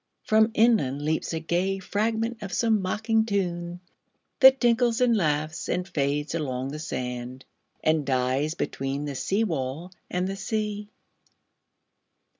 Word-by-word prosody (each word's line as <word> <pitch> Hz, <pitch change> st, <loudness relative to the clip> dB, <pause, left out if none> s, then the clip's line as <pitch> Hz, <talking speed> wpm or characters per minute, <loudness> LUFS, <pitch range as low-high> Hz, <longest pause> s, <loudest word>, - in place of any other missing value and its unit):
From 220 Hz, 0 st, +4 dB
inlandLeaps 160 Hz, -, +2 dB
a 165 Hz, -, -2 dB
gay 180 Hz, +4 st, 0 dB
fragment 220 Hz, +4 st, -1 dB
of 195 Hz, -2 st, -6 dB
some 220 Hz, -2 st, +2 dB
mocking 220 Hz, +4 st, +1 dB
tune, 175 Hz, -4 st, -2 dB, 0.6 s
That 265 Hz, -1 st, +8 dB
tinkles 240 Hz, 0 st, +3 dB
and 245 Hz, -2 st, +4 dB
laughs 155 Hz, -3 st, -1 dB
and 180 Hz, +1 st, -1 dB
fades 145 Hz, -1 st, -1 dB
along 135 Hz, -5 st, -2 dB
the 150 Hz, +2 st, -6 dB
sand, 125 Hz, -3 st, -5 dB, 0.4 s
And 155 Hz, -1 st, +2 dB
dies 130 Hz, +3 st, 0 dB
between 135 Hz, +2 st, -3 dB
the 145 Hz, -, -4 dB
seawall 165 Hz, -2 st, -2 dB, 0.2 s
and 180 Hz, +1 st, -1 dB
the 195 Hz, -, -3 dB
sea. 210 Hz, 0 st, -3 dB
175 Hz, 125 wpm, -26 LUFS, 145-220 Hz, 0.6 s, That